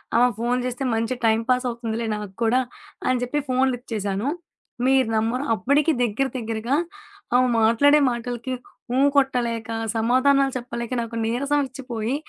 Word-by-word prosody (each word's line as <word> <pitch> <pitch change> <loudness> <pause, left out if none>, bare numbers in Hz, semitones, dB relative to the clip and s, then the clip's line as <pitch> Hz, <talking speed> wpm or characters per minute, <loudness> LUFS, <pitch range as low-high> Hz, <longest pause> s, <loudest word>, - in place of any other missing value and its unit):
ఆమె 245 +1 +6
ఫోను 240 +2 0
చేస్తే 250 +2 -3
మంచి 230 +3 0
టైమ్ 225 0 +3
పాస్ 255 0 +2
అవుతుందిలే 230 -1 -3
నాకు 210 -2 -5
కూడా, 235 +3 +3 0.5
అని 255 -1 +2
చెప్పి 295 +4 -1
ఫోను 260 +1 +3
లిఫ్ట్ 245 0 -9
చేశాను. 205 +3 -2 0.6
మీరు 265 -2 +4
నమ్మరు, 230 +5 0
అప్పటికి 285 - +2
దగ్గర, 245 +3 +1
దగ్గరగా 225 +2 -2 0.6
ఆమె 255 - +4
మాట్లాడే 285 +7 +5
మాటలకి 240 +1 -4 0.4
ఊ - - +3 0.2
కొట్టలేక, 235 -4 +1 0.3
సమాధానాలు 265 +4 +3
చెప్పలేక 235 -1 -6
నాకు 230 0 -6
నీరసం 280 +6 0
ఒచ్చిపోయి, 250 -2 -4
245 Hz, 140 wpm, -23 LUFS, 225-260 Hz, 0.6 s, ఆమె